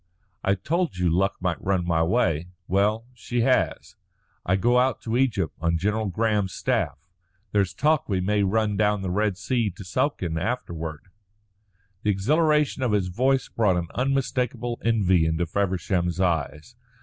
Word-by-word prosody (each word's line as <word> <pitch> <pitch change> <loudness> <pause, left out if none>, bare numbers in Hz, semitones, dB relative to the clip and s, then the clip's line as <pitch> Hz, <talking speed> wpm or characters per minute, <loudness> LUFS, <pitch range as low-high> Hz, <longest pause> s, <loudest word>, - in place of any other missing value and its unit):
"I 100 - +2
told 165 - -1
you 90 -2 +1
luck 95 +4 +1
might 90 -2 -2
look 95 -2 0
my 85 -2 +1
way. 85 -3 +1 0.2
Well, 105 +4 +1
she 120 0 -2
has. 130 +2 +1 0.5
I 90 - +1
go 120 +6 +3
out 130 -1 +1
to 115 0 -3
Egypt 125 -10 +1
on 85 0 +1
General 105 +5 0
Graham's 105 -1 0
staff. 80 +7 -2 0.4
There's 100 -3 +1
talk 155 -2 +1
we 95 -2 +1
may 105 +3 +1
run 105 +1 +1
down 105 -1 +1
the 90 - -2
Red 100 0 0
Sea 115 +1 0
to 100 +2 -10
Suakin 90 - -1
afterward." 80 -9 -4 1.0
The 105 - 0
exhilaration 150 - +2
of 125 -4 +1
his 95 -3 +1
voice 130 +8 +1
brought 105 -6 +1
an 85 -1 -3
unmistakable 125 -2 -1
envy 95 -7 +3
into 80 +2 0
Feversham's 90 -1 -1
eyes. 85 - -1
100 Hz, 155 wpm, -25 LUFS, 90-120 Hz, 1.0 s, go